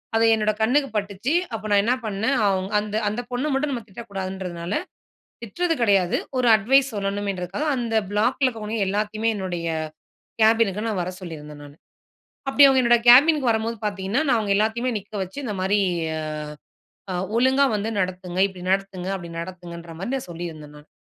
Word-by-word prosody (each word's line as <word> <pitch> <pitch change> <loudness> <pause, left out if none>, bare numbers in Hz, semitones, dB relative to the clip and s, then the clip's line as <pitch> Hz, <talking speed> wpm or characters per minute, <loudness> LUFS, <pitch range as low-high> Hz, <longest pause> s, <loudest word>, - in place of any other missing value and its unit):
அது 225 0 +4
என்னோட 215 -1 +2
கண்ணுக்கு 275 +5 +2
பட்டுச்சு. 205 +6 -2 0.2
அப்போ 220 -1 -5
நான் 200 -1 +5
என்னா 240 +4 +2
பண்ணேன். 215 +6 0
அவ்ங் 190 -1 0
அந்த 210 0 -5
அந்த 215 +4 -3
பொண்ணு 250 +4 -1
மட்டும் 280 +2 0
நம்ம 240 -4 -3
திட்டக்கூடாதுன்றதுனால. 190 -4 -6 0.7
திட்றது 330 - -1
கெடையாது. 195 -6 +3 0.2
ஒரு 250 - +2
அட்வைஸ் 265 +5 +3
சொல்லணுமேன்றதுக்காக 200 - -3
அந்த 235 -2 -2 0.2
பிளாக்ல 235 +6 +2
இருக்கிறவங்க 225 -3 -3
எல்லாத்தையுமே 215 +3 0
என்னுடைய 180 -3 -4 0.8
கேபினுக்கு 220 -2 +3
நான் 210 -4 -1
வர 180 - -3
சொல்லியிருந்தேன் 150 -4 -9
நானு. 145 0 -13 0.7
அப்டி 280 +1 +5
அவுங்க 265 -1 +4
என்னோட 240 -1 +5
கேபின்க்கு 275 +2 +7
வரம்போது 225 +1 -1
பாத்தீங்கன்னா, 200 +5 -1
நான் 245 - +4
அவுங்க 205 -3 0
எல்லாத்தையுமே 225 +4 0
நிக்க 205 +2 -21
வச்சு, 190 +5 -11
இந்த 215 - -3
மாரி 200 +2 +2 0.4
ஆ - - -3 0.9
அ - - -2 0.2
ஒழுங்கா 260 +3 +4
வந்து 210 +1 -2
நடத்துங்க. 185 -1 -3
இப்டி 185 -2 -11
நடத்துங்க, 190 -1 -1
அப்டி 170 -2 -9
நடத்துங்கன்ற 170 -1 -8
மாரி 210 +8 -3
நான் 255 -9 -5
சொல்லியிருந்தேன் 165 -3 -7
நானு. 150 +1 -17
205 Hz, 160 wpm, -23 LUFS, 185-235 Hz, 0.9 s, கேபின்க்கு